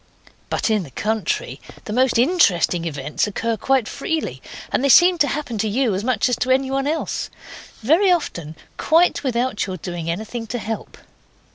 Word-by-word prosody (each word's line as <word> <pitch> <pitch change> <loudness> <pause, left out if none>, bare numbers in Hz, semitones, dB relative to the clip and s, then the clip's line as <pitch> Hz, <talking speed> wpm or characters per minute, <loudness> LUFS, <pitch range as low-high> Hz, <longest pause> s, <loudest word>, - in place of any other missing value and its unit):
But - - 0
in 215 -2 +2
the 165 - -9
country 220 - -2 0.2
the 210 - -5
most 255 0 +2
interesting 200 - +3
events 150 +2 -2
occur 225 +3 -2
quite 260 +1 +1
freely, 320 +3 -3 0.3
and - - 0
they 280 - +2
seem 350 +6 +6
to 290 - +4
happen 265 -6 -3
to 220 - 0
you 240 0 +1
as 190 +2 -2
much 245 -2 +1
as 250 - +1
to 255 - -2
anyone 270 +1 +1
else. 315 +2 -2 0.5
Very 340 - +4
often 170 - -2 0.2
quite 330 +2 +3
without 245 -4 -1
your 185 -1 -4
doing 170 -1 -5
anything 220 +6 -4
to 245 - -3
help. 220 -1 -6
235 Hz, 170 wpm, -21 LUFS, 205-275 Hz, 0.5 s, seem